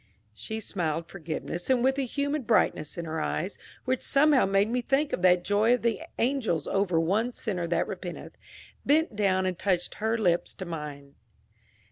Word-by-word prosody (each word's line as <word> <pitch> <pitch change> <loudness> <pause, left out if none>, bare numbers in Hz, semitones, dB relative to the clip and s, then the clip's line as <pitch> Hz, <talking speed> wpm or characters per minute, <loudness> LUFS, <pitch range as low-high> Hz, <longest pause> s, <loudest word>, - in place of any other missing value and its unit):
She 220 - -6
smiled 165 -6 -2
forgiveness, 170 +1 -5
and 250 -2 +3
with 265 +1 +2
a 270 - 0
humid 285 0 -2
brightness 195 -9 +1
in 170 - -4
her 160 0 -3
eyes, 185 +6 -3 0.3
which 255 0 0
somehow 285 -4 +4
made 195 +1 +3
me 245 +2 0
think 275 +4 0
of - - -1
that 180 -1 +4
joy 215 +5 +3
of 250 - -7
the 230 -3 0 0.2
angels 230 - 0
over 195 -4 +1
one 210 +9 +1
sinner 185 -8 -3
that 170 - 0
repenteth, - - -7 0.5
bent 305 -4 +2
down 190 -2 +2
and 185 -2 -2
touched 180 -3 0
her 220 +1 +1
lips 175 -6 +1
to 190 - -6
mine. 150 -4 -7
200 Hz, 175 wpm, -28 LUFS, 170-245 Hz, 0.5 s, somehow